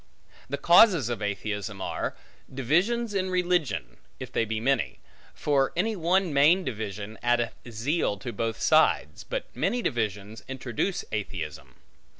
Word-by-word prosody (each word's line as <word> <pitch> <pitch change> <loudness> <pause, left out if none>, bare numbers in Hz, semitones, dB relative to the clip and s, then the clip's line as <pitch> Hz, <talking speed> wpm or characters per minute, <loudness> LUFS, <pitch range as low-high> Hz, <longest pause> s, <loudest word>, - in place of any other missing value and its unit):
The 140 - -2
causes 170 - +6
of 120 -3 -3
atheism 105 0 -3
are: - - -3 0.4
divisions 185 - +1
in 190 -1 0
religion, 175 - 0 0.2
if - - -7
they 115 - +1
be 110 0 -2
many; 135 +4 0 0.4
for 140 -2 +1
any 215 +5 0
one 180 -1 +1
main 155 +7 +5
division, 105 - -5
addeth 120 -1 +1 0.2
zeal 120 +1 0
to 120 +3 -6
both 115 +1 -2
sides; 155 0 +3
but - - -5
many 245 -1 0
divisions 110 -3 -2
introduce 130 - -2
atheism. 90 -7 -5
130 Hz, 135 wpm, -27 LUFS, 110-175 Hz, 0.4 s, causes